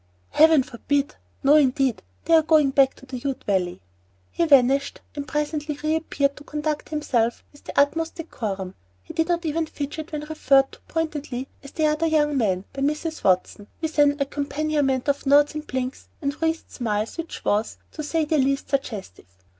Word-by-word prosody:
"Heaven 315 Hz, -3 st, +6 dB
forbid! 280 Hz, +4 st, -1 dB, 0.3 s
No 280 Hz, +2 st, +6 dB
indeed, 265 Hz, -3 st, +2 dB, 0.2 s
they 330 Hz, -, +2 dB
are 325 Hz, -, +8 dB
going 310 Hz, -3 st, +4 dB
back 270 Hz, -1 st, +4 dB
to -, -, -15 dB
the 255 Hz, -1 st, -6 dB
Ute 270 Hz, 0 st, -4 dB
Valley." 180 Hz, -, -1 dB, 0.5 s
He 340 Hz, -, 0 dB
vanished, 275 Hz, -1 st, +4 dB, 0.2 s
and 285 Hz, -1 st, -5 dB
presently 300 Hz, 0 st, -2 dB
re 310 Hz, +1 st, +2 dB
appeared 280 Hz, -3 st, 0 dB
to 290 Hz, -, -11 dB
conduct 300 Hz, 0 st, -3 dB
himself 250 Hz, -7 st, 0 dB
with 290 Hz, -, -20 dB
the -, -, -1 dB
utmost 320 Hz, +3 st, +1 dB
decorum. 200 Hz, -, -5 dB, 0.3 s
He -, -, -10 dB
did 325 Hz, 0 st, +1 dB
not 345 Hz, -1 st, 0 dB
even 320 Hz, +1 st, 0 dB
fidget 305 Hz, +3 st, -6 dB
when 300 Hz, -1 st, -3 dB
referred 275 Hz, -3 st, +3 dB
to -, -, -15 dB
pointedly 295 Hz, -5 st, -3 dB
as 280 Hz, -, -11 dB
"the 310 Hz, +3 st, -1 dB
other 305 Hz, +2 st, +2 dB
young 295 Hz, -2 st, +2 dB
man," 195 Hz, -7 st, 0 dB
by 275 Hz, -, -5 dB
Mrs. 300 Hz, +3 st, -2 dB
Watson, 190 Hz, +2 st, +1 dB
with 320 Hz, -2 st, -3 dB
an 290 Hz, 0 st, +4 dB
accompaniment 285 Hz, -1 st, -1 dB
of 285 Hz, 0 st, 0 dB
nods 290 Hz, +1 st, +5 dB
and 305 Hz, 0 st, -6 dB
blinks 255 Hz, 0 st, -4 dB
and 280 Hz, -1 st, -1 dB
wreathed 325 Hz, 0 st, -1 dB
smiles 220 Hz, +3 st, -2 dB
which 330 Hz, 0 st, -6 dB
was, 210 Hz, +2 st, 0 dB
to 310 Hz, -, -6 dB
say 310 Hz, +1 st, 0 dB
the 305 Hz, 0 st, +1 dB
least, 275 Hz, +1 st, 0 dB
suggestive. 220 Hz, -, -3 dB
285 Hz, 180 wpm, -24 LUFS, 265-310 Hz, 0.5 s, are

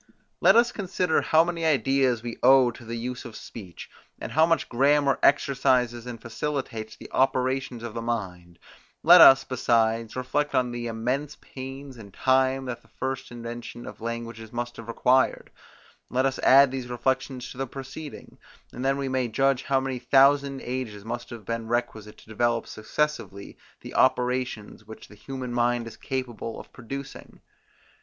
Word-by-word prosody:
Let -, -, +6 dB
us 235 Hz, +1 st, +5 dB
consider 180 Hz, -4 st, 0 dB
how 160 Hz, +1 st, +4 dB
many 170 Hz, -1 st, -3 dB
ideas 135 Hz, -5 st, +2 dB
we 120 Hz, -1 st, -6 dB
owe 130 Hz, -2 st, +6 dB
to 120 Hz, -, -13 dB
the 115 Hz, +1 st, -5 dB
use 125 Hz, +2 st, -5 dB
of 120 Hz, -3 st, -10 dB
speech; 95 Hz, -6 st, -10 dB, 0.4 s
how 160 Hz, +5 st, +4 dB
much 165 Hz, -1 st, +1 dB
grammar 140 Hz, +2 st, +2 dB
exercises, 125 Hz, -4 st, +2 dB
and 120 Hz, -2 st, -7 dB
facilitates 115 Hz, -2 st, -4 dB
the -, -, -13 dB
operations 130 Hz, -2 st, 0 dB
of 120 Hz, -2 st, -6 dB
the 115 Hz, -, -4 dB
mind; 90 Hz, -7 st, -4 dB, 0.5 s
let 175 Hz, +1 st, +9 dB
us, 135 Hz, -3 st, +9 dB
besides, 115 Hz, -3 st, 0 dB
reflect 145 Hz, +3 st, -1 dB
on 125 Hz, -1 st, +1 dB
the 120 Hz, 0 st, -4 dB
immense 125 Hz, +6 st, -2 dB
pains 135 Hz, 0 st, -9 dB
and 100 Hz, -3 st, -12 dB
time 130 Hz, 0 st, +2 dB
that 125 Hz, -2 st, -5 dB
the -, -, -25 dB
first 130 Hz, 0 st, -5 dB
invention 120 Hz, 0 st, -8 dB
of -, -, -10 dB
languages 115 Hz, -1 st, -6 dB
must 120 Hz, 0 st, -5 dB
have 115 Hz, -, -9 dB
required: 125 Hz, +3 st, +1 dB, 0.6 s
Let 130 Hz, +1 st, +1 dB
us 135 Hz, 0 st, -1 dB
add 135 Hz, 0 st, +6 dB
these 130 Hz, -2 st, -5 dB
reflections 130 Hz, +1 st, -2 dB
to 125 Hz, -, -11 dB
the 135 Hz, -, -2 dB
preceding; 135 Hz, +4 st, -9 dB, 0.3 s
and 125 Hz, -, -6 dB
then 135 Hz, +1 st, +1 dB
we 140 Hz, -1 st, -2 dB
may 130 Hz, -1 st, 0 dB
judge 135 Hz, +2 st, +1 dB
how 135 Hz, -1 st, +2 dB
many 130 Hz, -1 st, -3 dB
thousand 135 Hz, +2 st, +3 dB
ages 120 Hz, -5 st, -5 dB
must 120 Hz, +1 st, -5 dB
have 115 Hz, -4 st, -9 dB
been 115 Hz, 0 st, -4 dB
requisite 110 Hz, -3 st, -3 dB
to -, -, -18 dB
develop 115 Hz, +1 st, 0 dB
successively 110 Hz, -3 st, -3 dB, 0.3 s
the -, -, -9 dB
operations, 125 Hz, -4 st, 0 dB
which 110 Hz, +1 st, -12 dB
the -, -, -14 dB
human 125 Hz, +3 st, -7 dB
mind 120 Hz, 0 st, +1 dB
is 115 Hz, -1 st, -9 dB
capable 120 Hz, -4 st, -5 dB
of -, -, -13 dB
producing. 135 Hz, +3 st, -9 dB
125 Hz, 165 wpm, -26 LUFS, 115-135 Hz, 0.6 s, let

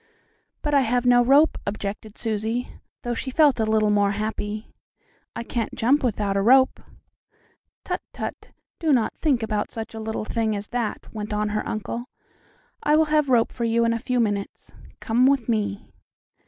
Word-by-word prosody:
"But 295 Hz, -, -1 dB
I 280 Hz, -, +5 dB
have 245 Hz, 0 st, 0 dB
no 245 Hz, 0 st, +6 dB
rope," 280 Hz, +5 st, +4 dB
objected 205 Hz, +1 st, -5 dB
Susie, 225 Hz, +2 st, -2 dB, 0.3 s
though 240 Hz, -, -2 dB
she 260 Hz, -, -4 dB
felt 285 Hz, -2 st, +4 dB
a 220 Hz, -, +2 dB
little 215 Hz, -1 st, +2 dB
more 205 Hz, -1 st, +2 dB
happy. 215 Hz, +1 st, -4 dB, 0.6 s
"I -, -, -4 dB
can't 230 Hz, -1 st, -3 dB
jump 270 Hz, +6 st, +2 dB
without 205 Hz, -4 st, 0 dB
a 195 Hz, -, +2 dB
rope." 260 Hz, +5 st, +4 dB, 1.0 s
"Tut! -, -, -2 dB
tut! -, -, -6 dB, 0.3 s
Do 320 Hz, -3 st, +1 dB
not 235 Hz, -4 st, +1 dB
think 265 Hz, -7 st, +1 dB
about 210 Hz, -1 st, -1 dB
such 225 Hz, 0 st, -7 dB
a 220 Hz, -, -6 dB
little 220 Hz, -1 st, -4 dB
thing 220 Hz, -1 st, -1 dB
as 205 Hz, +1 st, -6 dB
that," 240 Hz, -3 st, -3 dB
went 210 Hz, -1 st, -5 dB
on 210 Hz, 0 st, 0 dB
her 215 Hz, 0 st, -1 dB
uncle. 230 Hz, +2 st, -4 dB, 0.8 s
"I 300 Hz, -, +3 dB
will 315 Hz, +1 st, +4 dB
have 300 Hz, -2 st, +3 dB
a -, -, +1 dB
rope 235 Hz, -2 st, +3 dB
for 235 Hz, -, -4 dB
you 230 Hz, 0 st, +2 dB
in 230 Hz, -, +2 dB
a 230 Hz, -, -2 dB
few 250 Hz, +1 st, -1 dB
minutes. 205 Hz, -3 st, -2 dB, 0.3 s
Come 240 Hz, +3 st, +3 dB
with 275 Hz, -4 st, +2 dB
me." 210 Hz, -2 st, -1 dB
230 Hz, 180 wpm, -24 LUFS, 215-250 Hz, 1.0 s, no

